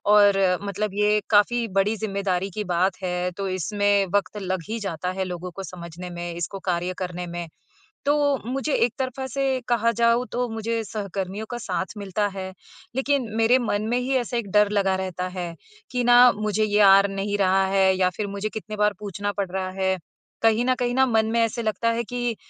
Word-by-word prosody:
और 205 Hz, -1 st, +6 dB, 0.2 s
मतलब 200 Hz, 0 st, -3 dB
ये 210 Hz, +1 st, +3 dB
काफ़ी 230 Hz, +3 st, +3 dB
बड़ी 210 Hz, +3 st, +2 dB
ज़िम्मेदारी 195 Hz, -3 st, -2 dB
की -, -, 0 dB
बात 185 Hz, +2 st, +1 dB
है, 180 Hz, 0 st, -1 dB
तो 195 Hz, +2 st, -4 dB
इसमें 200 Hz, +2 st, +1 dB
वक्त 205 Hz, +1 st, 0 dB
लग 185 Hz, -2 st, -2 dB
ही 230 Hz, +1 st, -2 dB
जाता 180 Hz, -3 st, -3 dB
है -, -, +2 dB
लोगों 180 Hz, 0 st, -5 dB
को 195 Hz, +3 st, -7 dB
समझने 175 Hz, 0 st, -8 dB
में, 175 Hz, 0 st, -5 dB
इसको 175 Hz, +3 st, -4 dB
कार्य 180 Hz, +1 st, -1 dB
करने 180 Hz, -1 st, -4 dB
में।" 170 Hz, 0 st, -5 dB, 0.6 s
तो 290 Hz, -, +4 dB, 0.4 s
मुझे 270 Hz, +3 st, -1 dB
एक 235 Hz, -, +2 dB
तरफा 265 Hz, 0 st, -3 dB
से 265 Hz, 0 st, -1 dB
कहा 230 Hz, -1 st, +3 dB
जाऊ, 235 Hz, +1 st, +4 dB
तो 245 Hz, 0 st, -1 dB
मुझे 225 Hz, 0 st, -2 dB
सहकर्मियों 200 Hz, 0 st, -4 dB
का 240 Hz, -, -3 dB
साथ 190 Hz, -3 st, -3 dB
मिलता 200 Hz, +1 st, -1 dB
है। 190 Hz, -1 st, -5 dB, 0.4 s
लेकिन 270 Hz, -1 st, +1 dB
मेरे 230 Hz, +3 st, +4 dB
मन 215 Hz, -4 st, -1 dB
में 245 Hz, -, +2 dB
ही 255 Hz, +2 st, -1 dB
ऐसा 245 Hz, -1 st, -1 dB
एक 215 Hz, -4 st, -3 dB
डर 210 Hz, -1 st, +4 dB
लगा 195 Hz, -2 st, +2 dB
रहता 185 Hz, -1 st, -3 dB
है 180 Hz, -2 st, -5 dB, 0.4 s
कि 250 Hz, -1 st, -1 dB
ना, 245 Hz, 0 st, +7 dB
"मुझे 215 Hz, 0 st, 0 dB
ये 210 Hz, 0 st, +2 dB
आ 195 Hz, +1 st, +5 dB
नहीं 195 Hz, +1 st, -2 dB
रहा 190 Hz, 0 st, +3 dB
है 190 Hz, -1 st, +4 dB
या 185 Hz, -1 st, +2 dB
फिर 210 Hz, -, -2 dB
मुझे 200 Hz, +1 st, -3 dB
कितनी 215 Hz, 0 st, -6 dB
बार 210 Hz, 0 st, +2 dB
पूछना 205 Hz, 0 st, -3 dB
पड़ 195 Hz, -3 st, -1 dB
रहा 185 Hz, 0 st, -2 dB
है।" 190 Hz, 0 st, +1 dB, 0.4 s
कहीं 225 Hz, +1 st, +4 dB
न 255 Hz, 0 st, +3 dB
कहीं 245 Hz, 0 st, 0 dB
ना, 265 Hz, +1 st, +5 dB
मन 220 Hz, -2 st, +2 dB
में 235 Hz, -, +2 dB
ऐसे 230 Hz, +1 st, 0 dB
लगता 220 Hz, +1 st, 0 dB
है 230 Hz, +1 st, 0 dB
कि 240 Hz, -1 st, -2 dB
205 Hz, 205 wpm, -24 LUFS, 190-230 Hz, 0.6 s, ना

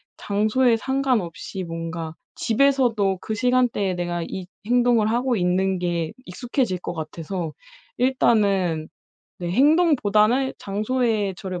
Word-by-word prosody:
장소에 220 Hz, +4 st, +2 dB
상관없이 230 Hz, -, -2 dB
뭔가 165 Hz, -1 st, -5 dB, 0.2 s
집에서도 230 Hz, -6 st, +2 dB
그 220 Hz, -, -4 dB
시간대에 245 Hz, -5 st, +1 dB
내가 175 Hz, -1 st, -2 dB
이 185 Hz, +1 st, -6 dB, 0.2 s
행동을 240 Hz, -2 st, +3 dB
하고 245 Hz, +1 st, +1 dB
있는 185 Hz, 0 st, +1 dB
게 170 Hz, -2 st, -2 dB
익숙해질 240 Hz, 0 st, -2 dB
것 175 Hz, -, -5 dB
같아서 165 Hz, +1 st, -5 dB, 0.5 s
일단은 200 Hz, -10 st, +2 dB, 0.5 s
내 175 Hz, -1 st, -4 dB
행동보다는 265 Hz, -, +3 dB
장소에 215 Hz, -1 st, -1 dB
저를 185 Hz, -2 st, -5 dB
210 Hz, 265 characters per minute, -23 LUFS, 180-245 Hz, 0.5 s, 행동을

